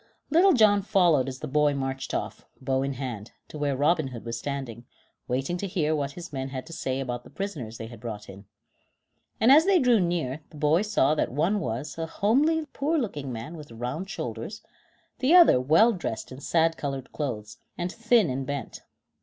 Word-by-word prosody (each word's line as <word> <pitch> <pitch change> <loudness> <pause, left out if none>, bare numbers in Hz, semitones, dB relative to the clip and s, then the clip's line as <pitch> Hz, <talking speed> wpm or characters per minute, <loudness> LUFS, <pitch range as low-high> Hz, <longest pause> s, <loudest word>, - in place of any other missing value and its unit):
Little 360 +5 +6
John 210 -5 +5
followed 175 -9 +3
as 130 -1 -6
the - - -4
boy 150 +1 +2
marched 135 -1 -3
off, - - -4 0.2
bow 130 0 0
in 135 0 -1
hand, 120 -5 -6 0.2
to 150 - -8
where 140 -2 0
Robin 155 +1 +2
Hood 120 -3 -9
was 115 0 -3
standing, 125 -2 -5 0.4
waiting 135 +8 -1
to 200 - -3
hear 155 -5 0
what 140 -2 -2
his 175 -1 -9
men 135 0 -3
had 130 -1 -6
to 165 - -10
say 130 -4 -2
about 125 -2 -4
the - - -14
prisoners 145 - -5
they 115 - -6
had 115 -1 -11
brought 105 -2 -7
in. 95 +1 -12 0.9
And 230 +4 +5
as 310 +4 +7
they 395 -2 +5
drew 250 -7 +4
near 165 -6 -1
the 150 - -13
boy 150 +4 +3
saw 205 -9 +2
that 155 - 0
one 170 +10 +1
was, 135 - -4
a 165 - -2
homely 295 - +2
poor 305 +4 0
looking 150 - -3
man 120 +8 -6
with 150 -2 -10
round 125 +11 -5
shoulders, 120 - -5 0.6
the 265 +7 +4
other, 340 - +7
well 165 - +5
dressed 170 - -4
in 130 - -8
sad 165 0 +2
colored 135 -3 -4
clothes, 110 -8 -5 0.2
and 175 0 -2
thin 230 -2 +3
and 135 +1 -2
bent. 140 -1 -5
145 Hz, 200 wpm, -26 LUFS, 130-195 Hz, 0.9 s, as